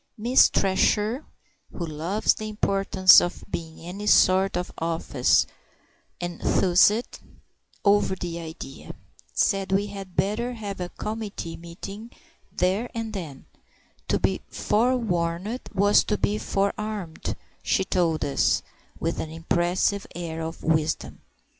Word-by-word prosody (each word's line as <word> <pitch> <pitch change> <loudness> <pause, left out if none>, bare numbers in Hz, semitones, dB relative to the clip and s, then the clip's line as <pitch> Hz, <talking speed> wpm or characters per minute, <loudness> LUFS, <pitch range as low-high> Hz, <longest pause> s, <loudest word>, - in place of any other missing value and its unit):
Miss 240 +4 +5
Thresher, 210 +6 +1 0.5
who 170 - -4
loves 165 +7 +1
the 215 0 -6
importance 195 -2 +5
of 175 - -4
being 160 -1 -5
in 175 +3 -8
any 210 0 -5
sort 190 -2 +4
of 180 - -3
office, 160 -6 +2 0.7
enthused 180 +5 +2 0.7
over 200 -1 +4
the 175 -2 -5
idea; 160 -4 -9 0.4
said 195 -1 +1
we 195 +1 +2
had 195 -3 -8
better 215 +6 0
have 205 -4 -6
a 175 - -3
committee 210 -7 -5
meeting 195 +6 -9 0.4
there 195 +7 0
and 225 -1 -4
then; 160 -9 -7 0.6
to - - +1
be - - 0
forewarned 210 -3 0
was 205 +1 +4
to 210 - 0
be 210 +1 0
forearmed, 200 -3 -2 0.3
she - - +1
told 170 -4 +1
us, 140 - +2 0.4
with - - -2
an 160 - -3
impressive 175 +4 0
air 165 -2 -4
of 160 +1 -6
wisdom. 155 0 0
190 Hz, 120 wpm, -25 LUFS, 170-210 Hz, 0.7 s, Miss